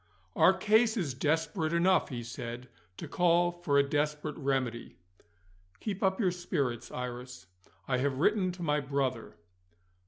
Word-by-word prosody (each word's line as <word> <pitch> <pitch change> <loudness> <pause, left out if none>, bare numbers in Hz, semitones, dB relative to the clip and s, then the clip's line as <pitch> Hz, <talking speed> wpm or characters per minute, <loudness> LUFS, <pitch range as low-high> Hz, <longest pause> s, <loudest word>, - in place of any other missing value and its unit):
"Our 190 - +5
case 220 +4 +3
is 160 -10 -1
desperate 155 +3 0
enough," 180 +2 +3
he 120 -4 -5
said, 120 +1 -7 0.3
"to - - -7
call 175 0 +3
for 175 -5 0
a 140 0 +4
desperate 150 +1 -1
remedy. 135 -5 -2 0.8
Keep 200 -3 -4
up 190 -1 +1
your 190 -5 +2
spirits, 150 -9 -2
Iris 125 -3 -6 0.4
I 130 -1 +1
have 135 0 0
written 185 +4 +2
to 180 0 -7
my 150 -2 +1
brother." 135 -4 -2
150 Hz, 145 wpm, -30 LUFS, 130-180 Hz, 0.8 s, Our